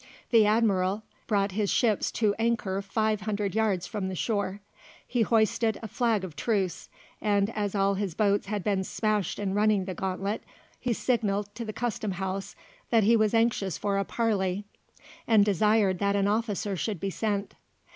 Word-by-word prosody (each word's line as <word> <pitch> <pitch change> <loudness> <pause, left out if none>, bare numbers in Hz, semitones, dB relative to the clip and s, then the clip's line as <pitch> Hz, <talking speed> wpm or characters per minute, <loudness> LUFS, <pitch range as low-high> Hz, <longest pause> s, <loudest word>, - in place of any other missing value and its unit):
The 225 -3 +6
Admiral 210 -2 +2 0.2
brought 200 -2 +1
his 205 +1 0
ships 220 -5 +2
to 215 -3 +2
anchor 225 -4 0
five 215 +1 0
hundred 205 -1 -2
yards 210 -5 +1
from 195 -3 -3
the 190 - -4
shore. 200 0 -1 0.5
He 245 - 0
hoisted 220 0 +2
a - - -3
flag 225 -2 0
of 175 -5 -7
truce, 190 -5 -1 0.3
and 205 0 +2
as 205 -2 -2
all 195 0 +2
his 195 -4 -3
boats 205 -2 +2
had 205 -2 -2
been 195 -2 +1
smashed 210 -2 -1
in 195 -2 -2
running 205 -2 +2
the 185 - -4
gauntlet, 190 +3 -2 0.4
he 245 -2 0
signalled 205 -4 0
to 235 +2 -6
the 215 - -4
Custom 220 -4 -2
House 190 +1 -4 0.3
that 225 -2 +4
he 230 +3 +5
was 215 0 +2
anxious 225 -6 +1
for 200 -1 0
a - - +1
parley, 200 -4 -1 0.6
and 215 -3 +5
desired 205 -1 +2
that 200 0 +1
an 200 -1 +2
officer 210 -1 0
should 190 +2 -3
be 195 +3 -2
sent. 205 -1 -2
205 Hz, 175 wpm, -28 LUFS, 195-220 Hz, 0.6 s, The